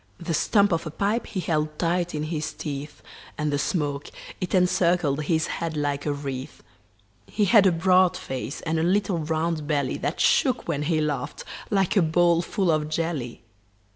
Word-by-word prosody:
The 170 -1 -3
stump 200 +5 +3
of 165 -1 -1
a - - -3
pipe 205 +8 -1
he 190 - -4
held 155 -3 -1
tight 175 0 0
in 150 - -2
his 155 -1 -3
teeth, 145 0 -6 0.3
And 150 -1 -1
the 145 - +1
smoke, 145 -3 -2 0.3
it 185 +1 -1
encircled 175 -5 +2
his 160 0 +1
head 165 -2 -3
like 145 0 -1
a - - +2
wreath. 135 -2 -6 0.6
He 210 - 0
had 200 -1 +6
a - - +5
broad 180 +1 +3
face 130 +1 -5
and 160 0 -1
a - - +1
little 190 0 +1
round 160 0 -1
belly 145 -4 0
That 145 - -3
shook 255 -3 +2
when 150 -4 -1
he 155 +1 +1
laughed 150 -2 -3 0.3
like 195 -1 +1
a 195 - +5
bowl 170 +1 +3
full 185 0 0
of 155 -1 0
jelly. 155 -7 -3
160 Hz, 180 wpm, -25 LUFS, 150-180 Hz, 0.6 s, had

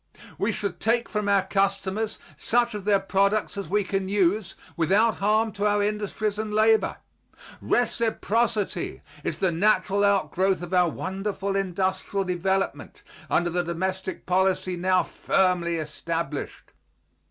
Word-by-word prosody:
We 210 - +1
should 200 -4 -4
take 235 +1 +1
from 210 -2 -1
our 200 -2 +4
customers 195 +2 -1 0.2
such 240 0 +1
of 205 -2 -6
their 205 -1 +4
products 200 +2 +1
as 200 -5 -5
we 205 +2 +2
can 195 0 -2
use 195 0 +1 0.2
without 200 +7 +3
harm 215 +2 +2
to 205 0 -1
our 205 0 +2
industries 210 0 -2
and 215 -1 -3
labor. 220 +1 +3 0.6
Reciprocity 225 -4 0 0.2
is 160 - -2
the 185 +1 +1
natural 200 +2 +2
outgrowth 190 -2 +2
of 175 +1 -7
our 180 -1 +4
wonderful 195 +3 -3
industrial 190 +1 -1
development 190 +1 -2 0.3
under 175 0 +2
the 175 +1 +1
domestic 185 +2 -3
policy 185 0 +1
now 185 +1 +2
firmly 180 -3 +1
established. 165 0 -4
195 Hz, 130 wpm, -25 LUFS, 185-210 Hz, 0.6 s, our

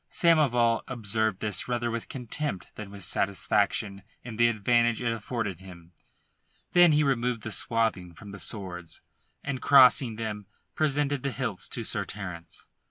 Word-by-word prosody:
Samoval 125 -9 +3
observed 110 -4 -2
this 105 -2 0
rather 120 -1 -1
with 115 0 -5
contempt 125 - -4
than 105 -2 -9
with 100 -1 -8
satisfaction 100 +1 0 0.2
in 115 -3 -8
the 120 +1 +5
advantage 120 +1 +2
it 115 -2 -1
afforded 110 -4 -4
him. 90 -3 -13 0.8
Then 175 -2 +6
he 150 0 +3
removed 125 -4 0
the 110 - -5
swathing 105 -7 0
from 100 +5 -11
the 100 - -9
swords, 90 -6 -3 0.4
and, 140 -2 -4
crossing 130 -3 +6
them, 105 -3 -5 0.3
presented 145 -2 0
the 140 - -2
hilts 125 -7 -4
to - - -4
Sir - - -1
Terence. 90 -4 -8
115 Hz, 150 wpm, -27 LUFS, 100-125 Hz, 0.8 s, Then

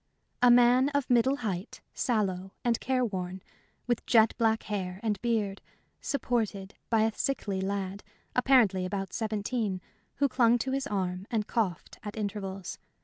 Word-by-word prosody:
A 245 - +7
man 245 +2 +6
of 285 -3 0
middle 245 +3 +4
height, 185 -2 -4
sallow, 195 -5 -1
and 235 -2 +2
careworn, 190 -8 -2 0.4
with 240 -2 0
jet 225 -2 +5
black 225 -1 +2
hair 190 -3 -4
and 210 -3 -1
beard, 215 -5 -1 0.4
supported 220 -8 -2 0.2
a 225 -1 +3
sickly 205 -8 -1
lad, 195 0 -3 0.3
apparently 245 -8 +4
about 195 0 -3
seventeen, 215 -2 -1 0.4
who 280 - +2
clung 245 -2 +4
to 260 +3 -2
his 275 +1 -1
arm 185 -2 -2
and 220 -3 0
coughed 200 -8 -2
at 210 +1 -7
intervals. 195 -3 -4
215 Hz, 140 wpm, -29 LUFS, 195-240 Hz, 0.4 s, A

